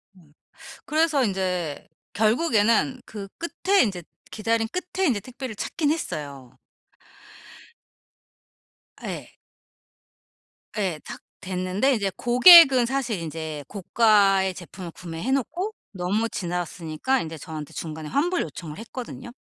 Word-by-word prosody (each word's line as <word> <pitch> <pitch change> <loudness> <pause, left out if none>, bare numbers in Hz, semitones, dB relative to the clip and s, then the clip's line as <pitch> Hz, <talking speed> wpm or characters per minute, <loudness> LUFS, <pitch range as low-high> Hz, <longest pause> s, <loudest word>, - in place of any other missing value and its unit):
음. 160 -5 -22 0.5
그래서 305 -3 +2
인제 180 -6 -2 0.2
결국에는 225 - +2
그 200 -2 -8
끝에 370 +4 +2
이제 190 -6 -3 0.3
기다린 225 +1 0
끝에 365 +1 -2
이제 230 -6 +1
택배를 255 +1 -7
찾긴 295 +5 -1
했어요. 140 - -5 2.5
예. - - -7 1.4
예. 185 -7 -1
탁 - - -8 0.2
됐는데 185 +7 0
인제 200 -4 0
고객은 260 0 +8
사실 250 -5 -1
인제 160 -2 -5
고가의 195 -2 +3
제품을 175 0 -9
구매해 170 +9 -5
놓고 350 - -1 0.2
너무 200 +5 -1
지났으니까 175 +5 -2
인제 160 -1 -6
저한테 155 0 -8
중간에 155 -1 -6
환불 340 - +1
요청을 155 -4 -8
했거든요. 240 +1 -8
205 Hz, 245 characters per minute, -24 LUFS, 175-260 Hz, 2.5 s, 고객은